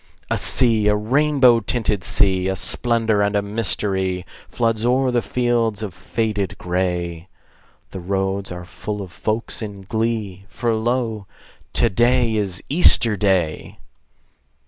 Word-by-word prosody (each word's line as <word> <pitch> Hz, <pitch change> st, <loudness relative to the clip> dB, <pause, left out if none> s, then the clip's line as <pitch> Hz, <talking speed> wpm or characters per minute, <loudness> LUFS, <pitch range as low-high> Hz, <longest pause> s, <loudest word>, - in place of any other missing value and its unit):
A -, -, +2 dB
sea, 115 Hz, -5 st, +3 dB
a 105 Hz, -, +4 dB
rainbow 130 Hz, +2 st, +3 dB
tinted 105 Hz, -3 st, -1 dB
sea, 95 Hz, -2 st, +2 dB
A 95 Hz, -, -1 dB
splendor 115 Hz, +1 st, +2 dB
and 100 Hz, 0 st, 0 dB
a 100 Hz, -, +1 dB
mystery, 95 Hz, -3 st, -1 dB, 0.2 s
Floods 115 Hz, -2 st, -1 dB
o'er 130 Hz, +2 st, +2 dB
the 120 Hz, -1 st, +1 dB
fields 115 Hz, -4 st, -1 dB
of 100 Hz, -4 st, -5 dB
faded 105 Hz, +1 st, -3 dB
gray: 90 Hz, -1 st, -3 dB, 0.6 s
The 95 Hz, -, -6 dB
roads 95 Hz, +1 st, -2 dB
are 90 Hz, 0 st, -7 dB
full 105 Hz, +3 st, -6 dB
of 90 Hz, -, -11 dB
folks 110 Hz, +6 st, -3 dB
in 100 Hz, -3 st, -7 dB
glee, 110 Hz, -2 st, -3 dB
For 115 Hz, +3 st, -2 dB
lo, 110 Hz, -2 st, -2 dB, 0.5 s
to -, -, +3 dB
day 120 Hz, +1 st, +2 dB
is 100 Hz, -4 st, -2 dB
Easter 135 Hz, -8 st, +4 dB
Day! 95 Hz, -5 st, -1 dB
105 Hz, 135 wpm, -20 LUFS, 95-115 Hz, 0.6 s, a